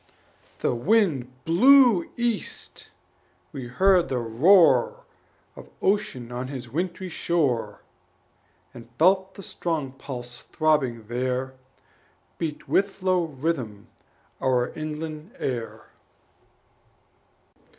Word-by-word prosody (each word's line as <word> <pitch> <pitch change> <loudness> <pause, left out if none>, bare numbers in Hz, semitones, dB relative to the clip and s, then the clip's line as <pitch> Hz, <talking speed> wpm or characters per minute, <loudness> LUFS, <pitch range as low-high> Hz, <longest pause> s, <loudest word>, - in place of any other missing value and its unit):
The - - +1
wind 150 - +1
blew 240 +2 +5
east; 235 -3 -3 0.6
we 135 -5 -7
heard 185 +7 +3
the 130 - -1
roar 180 - +4 0.5
Of - - -12
Ocean 195 - -1
on 125 +1 -4
his 130 -3 -7
wintry 175 +8 -3
shore, 160 -8 -1 0.9
And 115 -1 -12
felt 190 +3 +3
the 195 - -10
strong 160 -8 -3
pulse 125 -2 -8
throbbing 135 -8 0
there 130 +2 -2 0.9
Beat 155 -3 -4
with 195 -1 0
low 185 -2 +2
rhythm 135 -8 -4 0.5
our 125 -2 +1
inland 155 - -7
air. 120 -4 -5
155 Hz, 95 wpm, -25 LUFS, 125-185 Hz, 0.9 s, blew